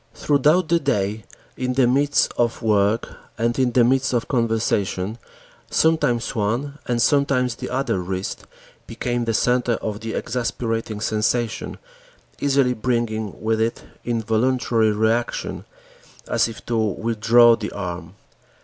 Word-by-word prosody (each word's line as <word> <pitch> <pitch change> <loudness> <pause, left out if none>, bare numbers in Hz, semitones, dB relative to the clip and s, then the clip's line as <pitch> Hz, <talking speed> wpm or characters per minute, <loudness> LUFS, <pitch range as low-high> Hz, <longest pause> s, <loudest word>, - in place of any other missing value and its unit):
Throughout 150 +4 +2
the 170 0 +3
day, 105 - -1 0.3
in 125 0 -2
the 130 0 +3
midst 140 +4 +2
of 120 0 0
work 105 +1 +2 0.3
and 120 +2 0
in 125 -2 +2
the 125 - +5
midst 130 +2 +2
of 120 - 0
conversation, 110 -4 -1 0.5
sometimes 140 -8 +1
one 120 +7 -2
and 120 -1 0
sometimes 130 0 +2
the - - -7
other 130 -6 -1
wrist 95 +1 -5 0.4
became 120 -1 -2
the 115 - 0
center 125 0 +2
of 105 -2 -4
the 115 0 -5
exasperating 115 -3 -3
sensation, 110 +2 -1 0.6
easily 135 -3 +2
bringing 110 -3 -2
with 110 0 0
it 115 +1 -1 0.2
involuntary 115 0 +1
reactions 110 +3 -1 0.6
as - - +2
if 115 -1 -10
to 115 - -1
withdraw 115 +2 +4
the 105 - -5
arm. 90 -2 -6
115 Hz, 130 wpm, -22 LUFS, 110-125 Hz, 0.6 s, the